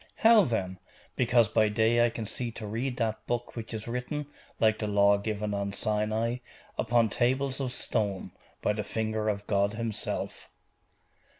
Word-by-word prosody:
'How, 225 -2 +6
then?' 95 -6 -2 0.4
'Because 120 -2 +4
by 110 -1 +3
day 110 +3 +3
I 120 - +4
can 115 -1 -5
see 120 +3 -3
to 110 - -7
read 120 +5 -2
that 110 -2 -1
book 120 0 -2
which 115 -2 -6
is 110 -1 -5
written, 125 +5 -3 0.3
like 110 -1 +3
the 105 - -1
Law 100 0 +4
given 105 0 -2
on 100 0 -2
Sinai, 110 +3 0 0.4
upon 115 0 +3
tables 130 +5 0
of 130 -2 -2
stone, 100 -5 -1 0.3
by 105 - +2
the 105 0 -3
finger 110 0 -1
of 100 -1 -2
God 100 0 +1
Himself. 110 -1 -4
110 Hz, 165 wpm, -29 LUFS, 105-120 Hz, 0.4 s, How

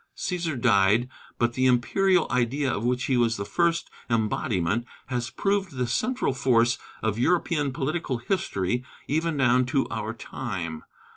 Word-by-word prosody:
Cæsar 170 -7 -2
died, 110 +1 +3 0.3
but 120 0 +1
the 130 +1 +2
imperial 170 +9 +3
idea 130 +2 +1
of 105 - -3
which 125 +1 0
he 130 - +1
was 115 -2 +2
the 100 - -4
first 170 +6 0 0.2
embodiment 110 -2 0 0.2
has 120 -2 -2
proved 195 -4 -1
the 125 -1 -1
central 250 - 0
force 120 -2 +2 0.2
of 110 0 0
European 150 -1 +1
political 135 0 -2
history 120 - -1 0.2
even 160 +2 0
down 130 -1 +4
to 135 +1 +1
our 110 -1 -3
time. 95 -11 -5
125 Hz, 145 wpm, -26 LUFS, 115-150 Hz, 0.3 s, down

